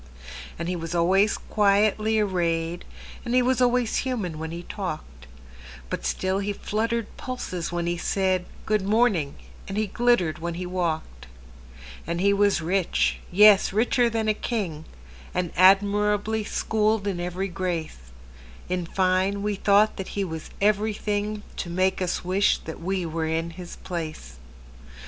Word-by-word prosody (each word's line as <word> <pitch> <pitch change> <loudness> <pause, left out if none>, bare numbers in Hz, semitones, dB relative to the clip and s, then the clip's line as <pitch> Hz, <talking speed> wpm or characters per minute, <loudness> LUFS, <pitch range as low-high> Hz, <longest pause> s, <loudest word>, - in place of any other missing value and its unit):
And 170 - -4
he 180 - -1
was 165 0 -4
always 190 +5 +3
quietly 215 +1 +2
arrayed, 175 -4 0 0.4
And 240 +1 -1
he 255 - +5
was 255 0 +1
always 245 -2 +2
human 210 - -2
when 160 0 -4
he 170 +1 -6
talked; 155 - -6 0.6
But - - -2
still 190 - 0
he 200 +1 -2
fluttered 225 +2 -2
pulses 185 -10 -4
when 175 0 -2
he 175 0 -1
said,"Good 190 +3 -1
morning," 200 -8 +2 0.3
and 195 - -4
he 215 - +2
glittered 210 -6 +1
when 170 +1 -4
he 180 +1 -4
walked. 160 - -3 0.8
And 170 +1 -2
he 200 +2 +3
was 200 -3 +3
rich,—yes, 195 +3 +4
richer 235 +3 +2
than 225 -1 -1
a 215 - +4
king,—And 160 - -5
admirably 205 +3 +3
schooled 215 -1 0
in 195 -3 -2
every 180 +2 -2
grace:In 65 - -6
fine, 190 +2 +1
we 210 0 0
thought 205 +2 +3
that 190 - -5
he 200 - +1
was 160 -4 -6
everythingTo 210 -1 -1
make 185 +2 0
us 180 0 -2
wish 190 +3 +3
that 160 - -7
we 185 +1 -1
were 160 0 -2
in 165 +1 -1
his 175 +1 -9
place. 160 - -6
190 Hz, 140 wpm, -25 LUFS, 170-210 Hz, 0.8 s, he